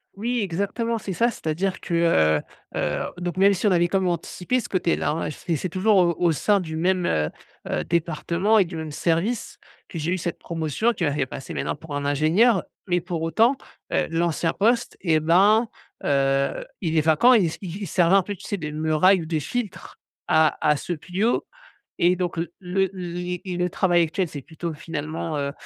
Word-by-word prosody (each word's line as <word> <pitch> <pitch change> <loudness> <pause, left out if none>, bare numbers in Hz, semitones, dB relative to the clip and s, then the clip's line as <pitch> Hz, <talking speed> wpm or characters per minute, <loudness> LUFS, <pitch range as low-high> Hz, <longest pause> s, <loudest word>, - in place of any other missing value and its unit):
Oui 240 +4 -1
exactement 200 +5 -1
c'est 195 -3 -5
ça, 235 +7 +2
c'est-à-dire 185 0 -2
que, 170 - -6
heu 80 - +3 0.3
heu, - - -1 0.2
donc 175 0 -4
même 200 +1 +5
si 195 +3 0
on - - +4
avait 175 -1 +3
quand 195 +2 +1
même 185 -1 0
anticipé 180 +8 -2
ce - - -6
côté-là 175 -5 0
hein, 155 -1 -2
c'est 165 +2 -3
c'est 180 +4 -3
toujours 195 +4 +2
au 170 -2 +3
au 175 -2 +3
sein 200 +6 +2
du 160 -3 -5
même, 180 +2 +1
heu 75 -1 +1 0.4
heu, - - -1
département 170 +5 +1
et 195 - +5
du 170 0 -8
même 160 -1 -5
service 170 +10 -1 0.3
que 165 - -6
j'ai 160 +3 -1
eu - - 0
cette 175 0 -4
promotion, 165 - -1
qui 185 - -4
m'a 145 -2 +1
fait 140 -3 -1
passer 135 - -7
maintenant - - -2
pour 150 -1 -8
un 145 - -2
ingénieur. 170 - +3 0.2
Mais 175 0 +2
pour 175 -2 -4
autant, 225 +11 +3 0.4
heu, - - +1
l'ancien 165 0 0
poste 230 +3 +1
et 160 -4 +2
ben, 200 +8 +4 0.4
heu, 135 -1 +1 0.2
il 165 -2 0
est - - +5
vacant 160 +12 +5
et - - +6
il - - +2
s 160 - -5
il 185 0 -6
il - - -4
servait 175 +3 +3
un 195 - +5
peu 205 +1 -5
tu - - -15
sais 205 - -2
de 150 -3 -5
muraille 160 +4 +3
ou - - -6
de 160 -1 0
filtre 195 - -5 0.3
à 155 0 +3
à 150 -1 +4
ceux 175 +2 -4
plus 185 +7 -2
haut, 240 - +1 0.5
et 175 +1 +4
donc 175 -2 -3
l 165 +1 -2
le 190 +1 0
li 180 -1 -4 0.2
le 180 0 0
travail 175 -2 +3
actuel 180 +3 -1
c'est 145 - -7
plutôt 165 +1 -6
finalement, 155 0 -4
heu, 140 0 -2
175 Hz, 215 wpm, -24 LUFS, 160-195 Hz, 0.5 s, et